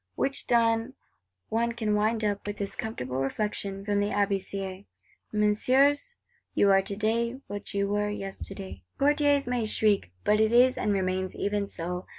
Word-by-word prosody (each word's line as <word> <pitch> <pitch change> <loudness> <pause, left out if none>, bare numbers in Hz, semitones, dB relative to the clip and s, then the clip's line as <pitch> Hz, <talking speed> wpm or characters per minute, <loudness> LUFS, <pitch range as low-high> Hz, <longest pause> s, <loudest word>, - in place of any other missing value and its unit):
Which 275 0 -1
done, 230 +1 +2 0.5
one 235 +1 0
can 220 -3 -1
wind 215 +2 +1
up 205 -1 -2
with 205 0 -4
this 200 -1 -4
comfortable 130 - -4
reflection 195 +7 -2
from 205 -1 +1
Abbé 205 -1 +1
Sieyes: 195 0 -5 0.5
'Messieurs, 260 - +3 0.4
you 200 - +4
are 195 0 +5
today 225 +5 -1
what 205 0 -7
you 200 0 +1
were 205 +1 0
yesterday.' 195 -1 -6 0.2
Courtiers 285 -1 +3
may 245 -2 0
shriek; 215 - +2
but 210 0 +3
it 220 0 +3
is, 250 +2 +5
and 210 - 0
remains, 185 -1 -1
even 205 0 -1
so. 180 0 -5
210 Hz, 155 wpm, -28 LUFS, 195-230 Hz, 0.5 s, are